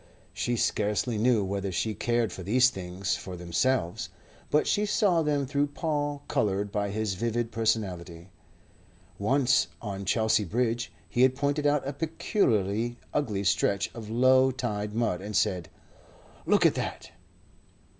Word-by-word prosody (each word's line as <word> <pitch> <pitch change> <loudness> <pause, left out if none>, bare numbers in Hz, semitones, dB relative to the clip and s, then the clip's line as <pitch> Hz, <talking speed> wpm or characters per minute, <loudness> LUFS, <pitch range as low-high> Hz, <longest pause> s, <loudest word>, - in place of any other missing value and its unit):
She 120 - -1
scarcely 105 +1 0
knew 115 -2 +3
whether 100 0 -2
she 110 +5 -1
cared 120 -3 0
for - - -7
these 125 +7 +4
things 90 -2 -3
for 95 - -7
themselves; 90 +3 0 0.4
but 150 - +3
she 205 - +1
saw 200 -4 +2
them 145 -2 0
through 145 +2 0
Paul 145 -1 -2
coloured 100 0 0
by 100 -1 -1
his 105 0 -1
vivid 115 +3 -2
personality. 95 -6 -2 0.9
Once 130 +4 +3
on 100 -3 -5
Chelsea 110 +1 +2
Bridge 115 +4 -1 0.2
he 120 - 0
had 130 0 +5
pointed 145 +2 0
out 145 -2 +1
a 140 - -2
peculiarly 120 - 0 0.2
ugly 110 -9 -1
stretch 100 +1 +1
of 110 -2 -8
low 130 +3 +5
tide 105 -5 -3
mud, 115 -6 0
and 105 +1 -6
said: 90 -6 0 0.8
"Look - - +4
at - - +5
that." - - -5
115 Hz, 145 wpm, -28 LUFS, 100-130 Hz, 0.9 s, had